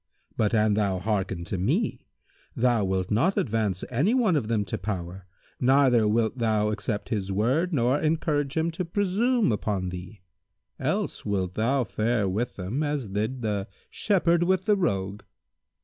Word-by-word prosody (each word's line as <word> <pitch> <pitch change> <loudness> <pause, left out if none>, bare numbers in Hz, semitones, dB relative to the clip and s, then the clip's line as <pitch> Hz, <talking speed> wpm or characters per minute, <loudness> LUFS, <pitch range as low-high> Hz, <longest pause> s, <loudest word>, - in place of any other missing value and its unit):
But, 110 +1 +1
an 105 -1 +3
thou 100 -3 +1
hearken 95 -3 -2
to 90 +1 -4
me, 95 - -1 0.5
thou 120 -3 +2
wilt 95 -1 -1
not 130 - +2
advance 105 -5 0
any 155 - +2
one 220 -9 +3
of 130 -8 0
them 110 -3 0
to - - -4
power 95 -2 -5 0.3
neither 130 -4 +4
wilt 110 +3 +1
thou 110 -2 +1
accept 105 +1 -3
his 100 -5 -2
word 130 - +1
nor 130 -1 +2
encourage 155 -2 0
him 160 +1 +1
to 170 +3 -3
presume 205 - +1
upon 100 -3 -1
thee; 90 +2 -9 0.6
else - - -2
wilt 95 -3 -1
thou 125 +6 +1
fare 110 -1 0
with 110 +6 -2
them 100 +10 -3
as 145 -7 -2
did 110 +6 -2
the 105 -2 -1 0.2
Shepherd 175 -4 +2
with 185 +1 +1
the 210 - +4
Rogue." 100 - -1
110 Hz, 160 wpm, -26 LUFS, 100-145 Hz, 0.6 s, neither